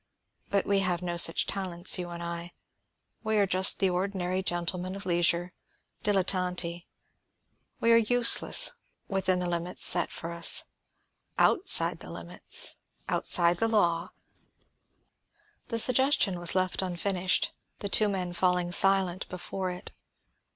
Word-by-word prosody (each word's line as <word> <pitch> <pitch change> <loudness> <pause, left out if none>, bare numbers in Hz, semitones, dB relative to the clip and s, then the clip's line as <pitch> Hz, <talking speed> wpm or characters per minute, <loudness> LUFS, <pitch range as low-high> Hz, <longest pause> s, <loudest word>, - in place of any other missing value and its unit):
But 200 -1 0
we 200 -1 +1
have 180 -2 -2
no 175 -1 -3
such 170 -1 +3
talents, 185 -2 +1
you 175 -1 -5
and 170 0 -7
I; 170 0 -7 0.7
we 220 -1 -1
are 205 - +3
just 185 0 +5
the 190 -2 +1
ordinary 185 0 -3
gentlemen 180 +1 -3
of 200 - -9
leisure, 175 0 0 0.5
dilettanti. 180 -3 -1 0.9
We 230 - +2
are 230 - +6
useless, 235 +1 +4 0.4
within 190 -1 -1
the 180 0 -3
limits 175 +1 -3
set 175 -1 +2
for 165 - -6
us. 170 0 +3 0.7
Outside 390 -1 +3
the - - -10
limits, - - -2 0.3
outside 175 -1 +2
the 225 - +1
law 175 -7 0 0.8
" - - -42
The 230 - -4
suggestion 255 -6 +2
was 175 +1 0
left 185 0 -1
unfinished, 185 0 -1 0.2
the 200 - -6
two 210 +1 +3
men 180 -3 -3
falling 180 -1 0
silent 190 -1 +1
before 185 +1 -6
it. 180 0 -9
185 Hz, 135 wpm, -27 LUFS, 175-195 Hz, 0.9 s, are